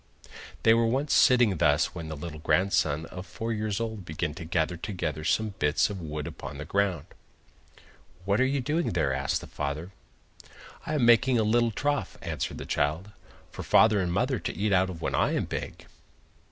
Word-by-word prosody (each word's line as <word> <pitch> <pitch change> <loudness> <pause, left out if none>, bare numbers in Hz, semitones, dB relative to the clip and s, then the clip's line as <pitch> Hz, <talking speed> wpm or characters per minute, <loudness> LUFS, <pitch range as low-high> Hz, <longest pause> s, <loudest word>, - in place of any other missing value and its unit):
They 115 - +6
were 115 0 +3
once 135 +5 0
sitting 120 -7 +5
thus 75 +1 +2
when 85 -3 -6
the 80 - -5
little 75 0 -7
grandson 80 -3 +1
of 90 - -7
four 115 0 -4
years 105 -1 -2
old 110 -3 -4
began 75 -1 -3
to 85 +2 -8
gather 80 +1 0
together 85 -4 -4
some 110 +6 0
bits 75 +7 +2
of 95 -3 -6
wood 75 -2 -5
upon 75 - -7
the 75 - -6
ground. 95 -4 0 1.2
'What 100 +4 +2
are - - +4
you 140 0 0
doing 155 - -1
there?' 80 -6 +1
asked 65 0 -1
the - - -9
father. 75 +5 -4 1.0
'I 155 - -1
am 135 -5 +2
making 120 +2 +5
a 110 - +2
little 120 +2 +3
trough,' 145 +6 -2
answered - - -3
the - - -7
child, 80 +8 -1 0.4
'for - - -7
father 110 -2 +4
and 90 -2 -1
mother 125 +8 0
to - - -5
eat 100 0 +1
out 95 0 +3
of 85 -3 -8
when - - -1
I - - +2
am - - 0
big. - - -6
95 Hz, 195 wpm, -27 LUFS, 80-115 Hz, 1.2 s, They